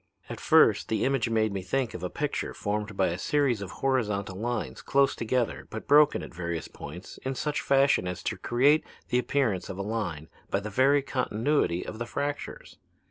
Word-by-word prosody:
At - - -6
first - - +4
the 110 - 0
image 135 -4 +1
made 110 -2 +1
me 95 - -2
think 130 +5 -1
of 90 - -6
a 90 - -3
picture 145 +7 -3
formed 105 0 -3
by 95 - +3
a 85 +2 -3
series 140 -6 +1
of 100 - -5 0.2
horizontal 105 -8 0
lines 110 - -3
close 140 0 +2
together 120 +1 -1
but 110 - -7
broken 150 +1 +5
at - - -9
various 85 -1 -4
points 90 +6 -10
in 135 0 -4
such 150 +3 -1
fashion 135 -8 +3
as 90 0 -5
to - - -1
create 140 +6 +3 0.3
the 125 - +2
appearance 125 -8 0
of 95 - -6
a 100 - -3
line 95 -8 -3 0.2
by 100 - +1
the 105 +1 -6
very 135 +5 +4
continuity 125 - 0
of 110 - -7
the 120 - -3
fractures. 145 +2 -5
115 Hz, 190 wpm, -28 LUFS, 95-135 Hz, 0.3 s, broken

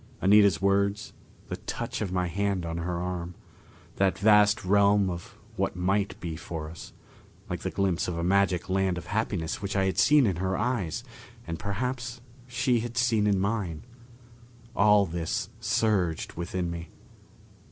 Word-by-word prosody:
Anita's 100 -2 +5
words, 100 +1 +1 0.3
the - - -4
touch - - -5
of 100 -4 -2
my 90 -1 0
hand 95 0 -1
on 85 0 -4
her 85 +1 -2
arm, 90 -1 -4 0.6
that 95 -1 +2
vast 105 0 +4
realm 100 0 +4
of 85 -1 -8 0.2
what - - -1
might 95 +3 0
be 85 -3 -5
for 80 -1 -6
us, 85 - -10 0.6
like - - -2
the - - -3
glimpse 95 -3 0
of 90 -2 -3
a 85 - -2
magic 95 -1 +2
land 95 -1 +1
of 85 - -6
happiness 100 -5 -2
which 100 0 -3
I 95 -1 +2
had 95 -1 0
seen 145 +6 +6
in 95 -6 0
her 95 +1 -1
eyes, 115 -10 -1 0.4
and 85 -1 -5
perhaps 120 +4 -3 0.3
she 125 0 +1
had 120 +2 -5
seen 115 -4 +2
in 100 -2 +2
mine 95 -6 -2 0.9
all 105 0 +5
this 85 -2 -3
surged 95 -8 0
within 85 +1 -3
me. 85 -1 -6
95 Hz, 160 wpm, -27 LUFS, 85-105 Hz, 0.9 s, seen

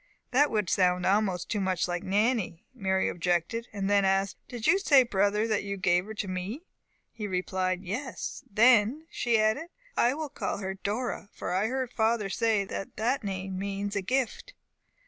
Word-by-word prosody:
"That 285 +3 +4
would 210 -4 0
sound 180 -1 +2
almost 195 -2 +1
too 210 - -1
much 185 -2 0
like 175 -1 -2
Nannie," 205 -3 0
Mary 190 -5 0
objected, 175 +7 -1
and 200 -2 -3
then 200 0 +4
asked, 195 0 +1
"Did 240 -3 -6
you 390 - +5
say, 280 -9 +6
brother, 210 -1 +1
that 215 -2 +1
you 200 0 -4
gave 180 -1 +2
her 220 +1 -8
to 205 - -3
me?" 190 - -4 0.5
He 210 -2 -5
replied, 185 0 -1
"Yes." 235 +8 -5
"Then," 235 +6 +4
she 235 -2 +1
added, 220 +10 +1 0.3
"I 245 +3 +3
will 310 -1 -4
call 285 - -3
her 190 -1 -3
Dora, 205 +2 -3
for - - -3
I 195 +4 +2
heard 260 0 -2
father 220 -2 +1
say 220 0 +1
that 195 - -6
that 245 +4 0
name 190 -1 -4
means 200 +1 -3
a 200 - +1
gift." 250 +4 -2
205 Hz, 180 wpm, -28 LUFS, 190-235 Hz, 0.5 s, say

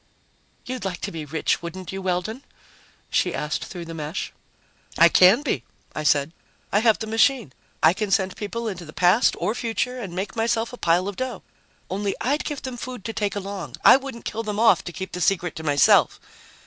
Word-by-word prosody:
"You'd 255 0 -5
like 185 -3 -3
to - - -3
be 160 -2 -6
rich, 155 +3 -1
wouldn't 170 +1 -7
you, 195 0 -5
Weldon?" 190 +7 -2 0.7
she 180 - +1
asked 150 +2 -3
through 175 -2 -8
the 165 - -7
mesh. 155 +1 -5 0.6
"I - - +7
can 190 +9 +6
be," 150 - -1 0.3
I - - -3
said. 145 0 +2 0.4
"I 205 - +4
have 220 -1 +4
the 220 - -5
machine. 225 - +2 0.3
I 160 - +7
can 210 +2 -3
send 190 -1 +1
people 230 +3 -4
into 185 -5 -5
the 155 -2 -11
past 185 +7 +4
or 215 - -1
future 245 +2 -2
and 190 -7 -6
make 195 +2 -4
myself 225 +1 0
a - - -7
pile 175 0 +2
of 200 - -5
dough. 255 -1 -4 0.4
Only 200 +1 -2
I'd 285 +5 0
give 295 -3 -4
them 260 -2 -5
food 250 -3 -7
to 225 - -3
take 205 -2 -2
along. 195 -9 -5
I - - +10
wouldn't 265 -3 -5
kill 225 - -3
them 210 -2 -3
off 230 0 +5
to 175 - -5
keep 190 +2 -6
the 180 - -5
secret 175 -2 +1
to 160 - -6
myself. 145 -3 +4
195 Hz, 205 wpm, -24 LUFS, 175-230 Hz, 0.7 s, I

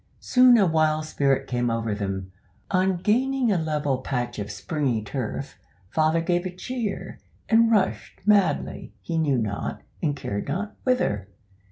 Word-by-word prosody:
Soon 250 -1 +6
a 205 - +5
wild 155 -2 +2
spirit 135 -3 +1
came 120 -2 -1
over 115 -1 -1
them. 95 -2 -4 0.4
On 185 -1 +2
gaining 245 +6 +1
a 195 - +2
level 150 -4 -1
patch 120 -3 -3
of 105 0 -4
springy 120 - -1
turf, 110 +2 -5 0.3
father 160 +1 +2
gave 175 +1 +1
a 180 - -8
cheer, 230 +1 -4 0.3
and 230 0 +5
rushed 210 -4 0
madly, 205 -3 +2
he 165 -1 -1
knew 145 -5 +2
not, 105 -3 -3 0.2
and 145 -2 0
cared 100 -7 -4
not, 195 +9 -3
whither. 105 - +1
155 Hz, 150 wpm, -25 LUFS, 120-200 Hz, 0.4 s, Soon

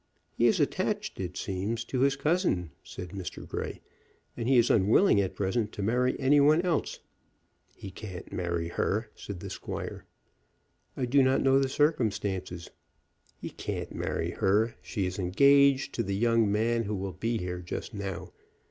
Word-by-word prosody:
He - - +4
is - - +3
attached, - - -1
it 90 -1 -4
seems, 105 +5 -3
to 130 - -3
his 135 +1 +3
cousin," 140 - 0
said 90 - -8
Mr. 95 0 -7
Grey, - - -5 0.5
"and 120 +1 -2
he 135 - +5
is 120 0 +4
unwilling 105 - +4
at 95 - -3
present 105 +2 -1
to 100 - -4
marry 125 +4 +1
any 140 +2 +4
one 150 +3 +5
else." 170 -5 -1 0.7
"He 95 - -9
can't 95 -2 -9
marry 85 -2 -2
her," 105 +5 -1
said 95 -4 -8
the - - -6
squire. - - -6 0.9
"I 130 - 0
do 135 +3 +4
not 130 0 +3
know 135 0 +5
the 135 -1 +1
circumstances." 100 - -1 0.7
"He - - -7
can't - - -5
marry - - -2
her. 110 +4 +2
She 100 -6 -3
is 90 +1 -4
engaged 140 +9 +4
to - - -1
the 100 0 -2
young 115 0 +2
man 115 +2 +1
who 105 +1 -2
will 95 -1 -4
be 115 +6 -1
here 90 -2 -4
just 90 +6 -6
now. 100 -3 -5
110 Hz, 165 wpm, -29 LUFS, 95-130 Hz, 0.9 s, he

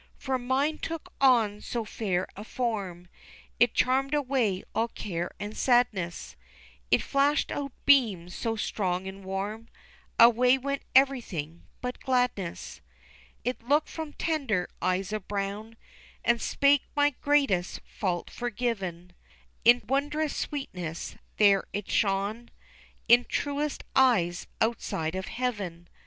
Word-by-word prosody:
For 265 -1 -2
mine 270 +5 0
took 330 -1 -6
on 225 -6 +4
so 235 -2 -3
fair 190 -4 -1
a 205 - -7
form 200 -8 -3 0.5
It 240 -1 +4
charmed 270 +3 +2
away 255 -9 0
all 230 - +1
care 175 -6 -4
and 205 +1 -5
sadness, 205 - +1 0.5
It - - +3
flashed 280 +1 +2
out 280 -1 -3
beams 210 -11 +4
so 225 -1 -2
strong 190 -4 -2
and 195 +1 -8
warm, 200 +4 -4 0.5
Away 245 +2 +7
went 280 +1 -3
everything 220 - +1
but 250 0 -4
gladness. 245 -9 -1 0.6
It 250 0 -2
looked 290 +6 +2
from 315 -2 -6
tender 265 - -1
eyes 185 +3 0
of 215 -3 -4
brown, 205 +3 -4 0.5
And 235 0 +3
spake 280 -1 +3
my 290 0 +4
greatest 275 -11 +1
fault 180 -4 -3
forgiven, 210 -8 -3 0.5
In 240 +2 +6
wondrous 290 +3 0
sweetness 180 - -4 0.2
there 200 -2 +5
it 205 0 -4
shone 205 +4 0 0.6
In 240 +1 +7
truest 290 +2 -2
eyes 185 -10 +3
outside 175 -8 -1
of 190 0 -4
heaven. 200 -9 -3
230 Hz, 120 wpm, -28 LUFS, 190-265 Hz, 0.6 s, Away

